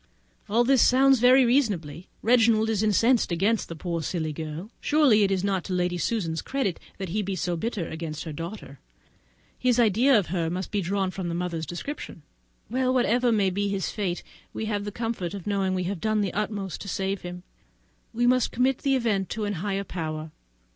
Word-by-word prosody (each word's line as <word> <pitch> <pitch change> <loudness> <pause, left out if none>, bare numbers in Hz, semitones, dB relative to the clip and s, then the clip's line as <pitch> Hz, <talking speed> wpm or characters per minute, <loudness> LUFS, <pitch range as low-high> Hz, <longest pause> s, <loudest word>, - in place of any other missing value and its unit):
All 230 +4 +3
this 265 0 +4
sounds 270 0 +5
very 255 +2 +6
reasonable. 190 - 0 0.2
Reginald 225 -1 +4
is 215 - 0
so 215 - +2
incensed 230 +1 +3
against 200 +6 +1
the 165 - -6
poor 170 +1 -3
silly 160 -2 -2
girl! 160 +7 -6
Surely 290 -8 +4
it 200 - +3
is 190 -1 0
not 195 -3 0
to 185 - -3
Lady 180 -1 0
Susan's 165 -6 -1
credit 265 -10 -2 0.2
that 190 -2 -5
he 205 +6 -1
should 210 - -2
be 195 - -1
so 175 -1 -1
bitter 195 0 -3
against 160 -1 -5
her 160 - -6
daughter; 165 -3 -7 0.8
his 250 -1 +2
idea 235 +4 +5
of 195 -6 0
her 165 -3 0
must 180 +2 -4
be 205 -1 0
drawn 190 +1 -1
from 185 -2 -4
the 170 - -2
mother's 170 -3 -3
description. 175 - -6 0.4
Well, 255 +2 0
whatever 245 -1 +2
may 200 -4 +2
be 200 +2 -1
his 195 -1 -2
fate, 185 -5 -3 0.3
we 220 - -3
have 205 -2 -2
the 205 - -4
comfort 220 -5 -3
of 195 - -8
knowing 195 -2 0
that - - 0
we 185 - -1
have 180 -1 -3
done 215 -1 +1
our 190 - -3
utmost 200 -3 -3
to - - -7
save 195 +1 -2
him. 180 0 -7 0.7
We 240 +1 0
must 250 0 +3
commit 255 +2 +1
the 275 -2 +1
event 215 -7 0
to 215 -1 -3
a 205 - -1
higher 195 +2 -2
power. 155 -4 -5
200 Hz, 210 wpm, -26 LUFS, 175-230 Hz, 0.8 s, very